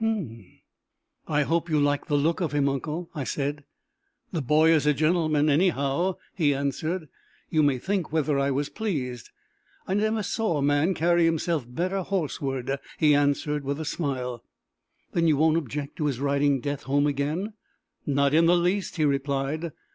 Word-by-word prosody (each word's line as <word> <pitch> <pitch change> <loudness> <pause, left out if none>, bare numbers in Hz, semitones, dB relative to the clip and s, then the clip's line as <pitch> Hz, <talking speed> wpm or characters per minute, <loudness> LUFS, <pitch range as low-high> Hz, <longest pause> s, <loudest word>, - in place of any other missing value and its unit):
"H'm!" 150 - -2 0.8
"I 150 -1 +2
hope 170 +3 0
you 155 -2 +2
liked 145 0 +1
the 145 - +1
look 160 +5 +1
of 165 -4 -1
him, 145 -1 +2
uncle!" 150 +5 -3
I 145 - -3
said. 145 +2 -3 0.7
"The 165 - -2
boy 155 +4 +4
is 155 -2 +3
a 150 - +4
gentleman 155 -1 +2
anyhow!" 155 +2 +2 0.2
he 150 -6 +2
answered. 155 +5 -2 0.4
"You 155 - +3
may 145 -3 +3
think 190 +4 -2
whether 150 -2 +1
I 140 0 +1
was 140 +1 0
pleased! 135 - -4 0.6
I 185 - -1
never 215 +1 +1
saw 210 -8 -1
man 145 +6 +2
carry 170 +1 +3
himself 165 -3 0
better 180 +9 -2
horseward!" 140 -7 -2 0.2
he 150 -2 +4
added 145 +1 +1
with 140 +2 -3
a 160 - -4
smile. 130 -7 -3 0.7
"Then 165 -1 +2
you 155 -3 +3
won't 160 +2 +3
object 145 -1 -4
to 150 - 0
his 135 -4 -2
riding 140 -1 +1
Death 145 0 -4
home 145 +1 +3
again?" 150 +9 -1 0.5
"Not 140 0 +1
in 165 +1 +5
the 175 +1 +5
least!" 180 +3 0
he 155 -3 +1
replied. 140 +3 -1
150 Hz, 170 wpm, -26 LUFS, 140-170 Hz, 0.8 s, in